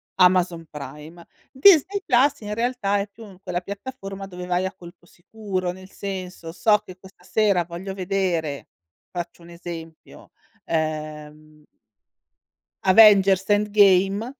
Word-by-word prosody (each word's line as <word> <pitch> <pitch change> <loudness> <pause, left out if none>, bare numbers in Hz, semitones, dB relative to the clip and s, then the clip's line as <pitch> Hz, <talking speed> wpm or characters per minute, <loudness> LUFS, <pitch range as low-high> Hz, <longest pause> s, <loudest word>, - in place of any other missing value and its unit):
Amazon 180 -2 +3
Prime. 150 +4 -10 0.3
Disney 380 +6 +5
Plus 270 +2 +3
in 210 0 -5
realtà 230 -4 0
è 200 - -3
più 205 -3 -14
quella 180 -1 -3
piattaforma 195 -1 -8
dove 180 -1 -8
vai 180 +1 0
a 190 - -4
colpo 175 0 -15
sicuro, 185 0 -5
nel 185 +1 -13
senso 185 -5 -7
so 210 +4 +3
che 190 -3 -13
questa 190 -2 -18
sera 200 -3 +1
voglio 175 +3 -7
vedere, 180 -6 -2 0.4
faccio 175 -1 -7
un 170 - -14
esempio, 165 -2 -10 0.3
ehm 155 -1 -5 1.2
Avengers: 195 -1 +6
Endgame. 205 +2 +3
185 Hz, 120 wpm, -23 LUFS, 170-205 Hz, 1.2 s, Avengers